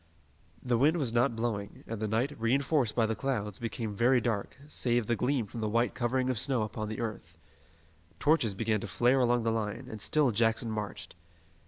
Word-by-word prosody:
The 120 Hz, -2 st, +1 dB
wind 155 Hz, +6 st, +4 dB
was 130 Hz, -8 st, -1 dB
not 120 Hz, -1 st, +2 dB
blowing, 110 Hz, -3 st, -3 dB
and 115 Hz, -2 st, -5 dB
the 110 Hz, -, -1 dB
night, 115 Hz, +7 st, 0 dB
reinforced 135 Hz, +1 st, +2 dB
by 115 Hz, -, +3 dB
the 110 Hz, -, 0 dB
clouds, 105 Hz, -5 st, -2 dB
became 115 Hz, -1 st, -4 dB
very 125 Hz, +3 st, +4 dB
dark, 110 Hz, -3 st, -2 dB
save 120 Hz, -5 st, 0 dB
the 120 Hz, -, +1 dB
gleam 125 Hz, +1 st, 0 dB
from 115 Hz, +3 st, -7 dB
the 110 Hz, -, 0 dB
white 115 Hz, +3 st, +1 dB
covering 130 Hz, +1 st, 0 dB
of 120 Hz, -, -2 dB
snow 130 Hz, -4 st, 0 dB
upon 105 Hz, 0 st, -4 dB
the 110 Hz, -, -5 dB
earth. 110 Hz, -4 st, -5 dB, 0.8 s
Torches 145 Hz, -10 st, +2 dB
began 110 Hz, 0 st, 0 dB
to -, -, -5 dB
flare 125 Hz, +3 st, +3 dB
along 120 Hz, -1 st, +2 dB
the 115 Hz, -, +1 dB
line, 110 Hz, +2 st, -3 dB
and 110 Hz, -3 st, -7 dB
still 150 Hz, 0 st, +2 dB
Jackson 115 Hz, +1 st, +1 dB
marched. 105 Hz, -2 st, -5 dB
115 Hz, 195 wpm, -30 LUFS, 110-125 Hz, 0.8 s, wind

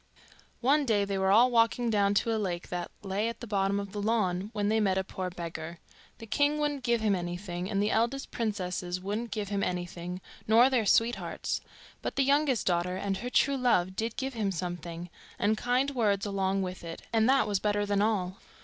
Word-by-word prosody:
One 285 Hz, +4 st, +4 dB
day 215 Hz, -6 st, +2 dB
they 195 Hz, -1 st, -2 dB
were 190 Hz, 0 st, +2 dB
all 235 Hz, +6 st, +6 dB
walking 230 Hz, 0 st, +3 dB
down 200 Hz, -1 st, +2 dB
to 225 Hz, +2 st, +2 dB
a 220 Hz, -, -1 dB
lake 175 Hz, -3 st, -3 dB
that 175 Hz, -1 st, -3 dB
lay 200 Hz, +3 st, -1 dB
at 230 Hz, -, -7 dB
the 240 Hz, -, -6 dB
bottom 200 Hz, -2 st, +1 dB
of 200 Hz, -1 st, -6 dB
the 205 Hz, 0 st, -4 dB
lawn 205 Hz, -3 st, 0 dB
when 205 Hz, -3 st, -1 dB
they 220 Hz, +1 st, +2 dB
met 195 Hz, -3 st, +2 dB
a 190 Hz, -, +1 dB
poor 185 Hz, -1 st, -4 dB
beggar. 170 Hz, -1 st, -6 dB, 0.4 s
The 225 Hz, -, -9 dB
king 290 Hz, +7 st, +2 dB
wouldn't 295 Hz, -2 st, -1 dB
give 235 Hz, -2 st, +1 dB
him 215 Hz, -2 st, +2 dB
anything, 175 Hz, 0 st, -4 dB
and 200 Hz, -2 st, 0 dB
the 210 Hz, -, +1 dB
eldest 240 Hz, +5 st, 0 dB
princesses 185 Hz, -5 st, -2 dB
wouldn't 210 Hz, +5 st, -3 dB
give 210 Hz, -3 st, -3 dB
him 200 Hz, -1 st, -1 dB
anything, 180 Hz, 0 st, -3 dB, 0.3 s
nor 235 Hz, +4 st, +6 dB
their 235 Hz, -5 st, +2 dB
sweethearts; 230 Hz, +3 st, +1 dB, 0.4 s
but -, -, -4 dB
the 275 Hz, -, +3 dB
youngest 275 Hz, -3 st, +2 dB
daughter 180 Hz, +1 st, +1 dB
and 195 Hz, 0 st, -2 dB
her 245 Hz, -, -4 dB
true 275 Hz, +2 st, +3 dB
love 190 Hz, -8 st, +2 dB
did 225 Hz, +2 st, -3 dB
give 265 Hz, 0 st, -2 dB
him 210 Hz, -4 st, -1 dB
something, 175 Hz, -1 st, -5 dB, 0.3 s
and 210 Hz, +2 st, +2 dB
kind 250 Hz, +5 st, +1 dB
words 210 Hz, -6 st, +1 dB
along 195 Hz, -1 st, 0 dB
with 185 Hz, -1 st, -6 dB
it, 165 Hz, -1 st, -7 dB
and 225 Hz, +1 st, +4 dB
that 270 Hz, -3 st, +4 dB
was 205 Hz, -2 st, +1 dB
better 205 Hz, 0 st, 0 dB
than 205 Hz, 0 st, +1 dB
all. 195 Hz, -4 st, 0 dB
205 Hz, 210 wpm, -29 LUFS, 185-230 Hz, 0.4 s, all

